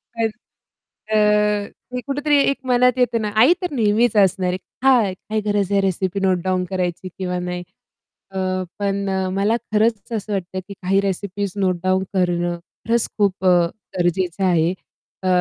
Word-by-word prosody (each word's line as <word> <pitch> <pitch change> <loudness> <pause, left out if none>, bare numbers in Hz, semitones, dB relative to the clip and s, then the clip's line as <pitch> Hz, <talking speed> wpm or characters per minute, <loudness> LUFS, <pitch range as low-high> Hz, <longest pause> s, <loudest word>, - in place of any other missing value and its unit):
पण 230 -1 +1 0.9
अ, 215 - +3 0.8
ते 250 - -2
कुठेतरी 290 +1 +2
एक 275 - -3
मनात 250 0 +3
येतं 245 -2 +2
ना, 210 - -1
आई 245 +10 +6
तर 360 -4 -2
नेहमीच 225 -1 +2
असणार 190 -2 +3
आहे - - -1 0.3
हां. 230 -8 +4 0.2
काही 215 0 0
गरज 205 -2 0
आहे 200 - +3
रेसिपी 190 0 -1
नोटडाउन 185 -1 +1
करायची 185 -1 -2
किंवा 180 -1 -2
नाही. 180 0 -4 0.7
अ, 190 - -5 0.4
पण 200 -1 -1
अ, 190 -1 0
मला 200 +4 +2 0.2
खरंच 220 0 +1
असं 215 -1 -3
वाटतं, 190 -1 -3
की 200 - -7
काही 195 +1 +1
रेसिपीज 200 0 -3
नोटडाउन 185 -1 +1
करणं 175 -2 0 0.3
खरंच 230 0 +2
खूप 195 -2 +1
अ, - - +5 0.5
गरजेचं 175 +1 0
आहे 170 -2 +3 0.5
अ, - - -3
195 Hz, 155 wpm, -21 LUFS, 185-220 Hz, 0.9 s, आई